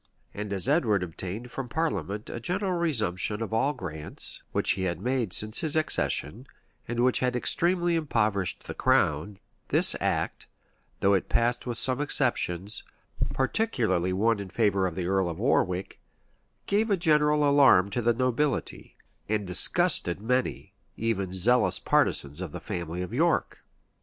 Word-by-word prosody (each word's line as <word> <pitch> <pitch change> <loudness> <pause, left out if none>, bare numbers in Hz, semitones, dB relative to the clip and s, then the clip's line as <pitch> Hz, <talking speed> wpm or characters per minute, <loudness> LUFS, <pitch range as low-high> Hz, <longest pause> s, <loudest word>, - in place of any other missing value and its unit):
And 105 0 -6
as 100 +3 0
Edward 115 - +2
obtained 95 +7 -7
from 130 -1 -6
parliament 115 -9 -3
a - - -6
general 185 - -2
resumption 105 - -1
of 110 - -6
all 125 +6 +1
grants, 80 - 0
which - - 0
he 95 - -2
had 85 -2 -3
made 125 -2 -2
since 105 +4 +3
his 160 -2 -1
accession, 125 - 0 0.4
and 120 0 -2
which 125 0 +2
had 125 -1 -1
extremely 175 +7 +1
impoverished 110 - -1
the - - -7
crown,[*] 80 +7 0 0.3
this - - +5
act, - - -2 0.5
though 100 - +3
it 95 - 0
passed 120 +1 0
with 120 -2 0
some 130 +3 +2
exceptions, 105 - +1 0.5
particularly 125 - 0
one 110 +4 +1
in 100 -2 -7
favor 100 -3 +1
of 85 - -6
the 90 - -3
earl 95 -1 0
of 80 - -6
Warwick, 95 -5 -1 0.6
gave 215 +3 0
a 200 - +2
general 150 -3 +2
alarm 135 -9 +5
to 120 - -2
the 120 0 +1
nobility, 130 +3 -2 0.3
and 105 -2 -1
disgusted 90 -1 +4
many, 125 +4 -2 0.2
even 100 -5 -2
zealous 115 +7 +2
partisans 70 +5 0
of 90 -5 -6
the - - -6
family 85 +1 -5
of 90 - -8
York. - - 0
115 Hz, 150 wpm, -27 LUFS, 95-135 Hz, 0.6 s, this